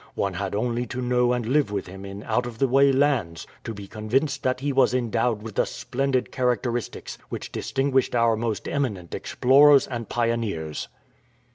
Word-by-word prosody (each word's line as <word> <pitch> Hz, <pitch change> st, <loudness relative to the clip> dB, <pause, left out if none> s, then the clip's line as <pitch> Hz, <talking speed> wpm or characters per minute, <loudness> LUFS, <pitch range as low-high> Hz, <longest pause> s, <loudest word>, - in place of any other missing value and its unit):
One 100 Hz, -1 st, -1 dB
had 100 Hz, +2 st, -3 dB
only 120 Hz, +2 st, -1 dB
to 125 Hz, -, -5 dB
know 125 Hz, 0 st, +2 dB
and 125 Hz, -2 st, -1 dB
live 135 Hz, -1 st, +2 dB
with 100 Hz, -2 st, -2 dB
him 95 Hz, +2 st, -10 dB
in 100 Hz, +1 st, -8 dB
out 120 Hz, +2 st, 0 dB
of 120 Hz, -2 st, -8 dB
the 135 Hz, -, +2 dB
way 135 Hz, +2 st, +5 dB
lands 130 Hz, -, +1 dB, 0.2 s
to -, -, -5 dB
be 100 Hz, -2 st, -8 dB
convinced 115 Hz, +8 st, -1 dB
that 130 Hz, 0 st, 0 dB
he 140 Hz, +1 st, -1 dB
was 130 Hz, -1 st, +3 dB
endowed 115 Hz, -2 st, 0 dB
with 110 Hz, -1 st, -7 dB
the -, -, +2 dB
splendid 130 Hz, +2 st, -2 dB
characteristics 120 Hz, -2 st, -2 dB
which -, -, -6 dB
distinguished 135 Hz, -2 st, 0 dB
our 115 Hz, -1 st, +3 dB
most 110 Hz, -1 st, -3 dB
eminent 105 Hz, -, -2 dB
explorers 140 Hz, +2 st, +5 dB
and 120 Hz, -4 st, -5 dB
pioneers." 115 Hz, -10 st, -2 dB
120 Hz, 175 wpm, -25 LUFS, 110-130 Hz, 0.2 s, way